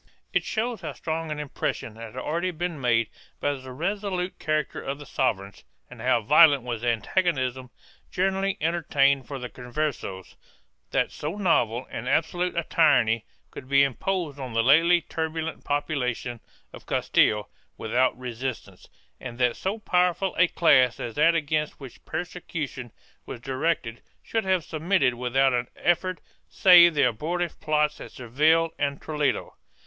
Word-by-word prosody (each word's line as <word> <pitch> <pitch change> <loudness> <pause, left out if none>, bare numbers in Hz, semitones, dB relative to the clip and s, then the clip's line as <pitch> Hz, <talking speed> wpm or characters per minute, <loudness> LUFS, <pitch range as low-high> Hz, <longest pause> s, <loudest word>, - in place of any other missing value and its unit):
2 - - +4
It - - -15
shows 230 +1 -2
how 155 -4 -5
strong 160 +2 -4
an 150 - -3
impression 135 -5 -4
had 115 +2 -10
already 170 +7 -1
been 170 -3 -4
made 115 -2 +2 0.3
by 145 - 0
the 130 -1 -9
resolute 190 +4 -3
character 155 -1 -1
of 140 +1 -4
the 145 - -11
sovereigns, 100 -8 -2 0.3
and - - -11
how 115 - +2
violent 145 +2 +6
was 120 -3 -4
the 120 - -2
antagonism 130 - 0 0.4
generally 195 +1 0
entertained 140 -5 +1
for 140 - -5
the 125 -1 -5
Conversos, 125 -8 -5 0.5
that - - 0
so - - -5
novel 130 - +1
and 125 +3 -4
absolute 175 +2 0
a 170 - +1
tyranny 115 -10 +3 0.3
could 130 - -10
be 140 0 +5
imposed 150 +2 -2
on 130 -3 -6
the 115 0 +2
lately 165 +7 +5
turbulent 160 +1 -4
population 125 -5 -2 0.3
of - - -13
Castile 105 -1 +2 0.3
without 125 +3 +1
resistance, 125 0 -6 0.3
and 120 -2 -8
that 125 -2 +2
so 195 +3 -3
powerful 180 -2 +1
a 180 - +4
class 130 -8 +4
as 115 - -5
that 165 +5 +4
against 155 -1 -1
which 135 -4 -12
persecution 160 -7 -5 0.4
was - - -7
directed 130 -2 -2 0.2
should 225 -2 -2
have 185 -3 +1
submitted 160 -4 +1
without 125 +2 +1
an 120 0 0
effort 175 -1 0 0.3
save 175 -3 +7
the 145 - +3
abortive 170 +8 -3
plots 150 -1 0
at - - -8
Seville 155 +7 +2
and 140 -1 -1
Toledo. 150 -3 -1
145 Hz, 150 wpm, -25 LUFS, 125-170 Hz, 0.5 s, save